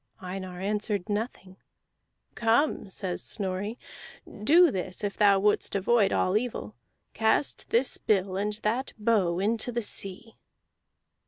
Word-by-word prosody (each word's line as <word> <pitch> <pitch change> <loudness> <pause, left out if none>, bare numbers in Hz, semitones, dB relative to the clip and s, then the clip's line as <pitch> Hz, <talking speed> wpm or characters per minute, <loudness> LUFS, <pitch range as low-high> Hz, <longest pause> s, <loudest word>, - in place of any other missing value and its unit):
Einar 185 -1 -6
answered 205 0 -2
nothing. 205 -3 -4 0.8
"Come," 230 0 +1
says 185 -1 -4
Snorri, 200 +3 -3 0.7
"do 330 +6 +6
this 185 0 -4
if 200 -1 -2
thou 200 -2 +5
wouldst 205 +1 +1
avoid 200 +1 +3
all 185 - +1
evil: 215 - -2 0.4
cast 220 +5 0
this 245 +3 +2
bill 190 -3 +1
and 205 +2 -1
that 240 +5 -1
bow 210 -6 +2
into 220 +5 0
the 235 -1 -2
sea." 205 +2 -4
205 Hz, 120 wpm, -27 LUFS, 190-225 Hz, 0.8 s, do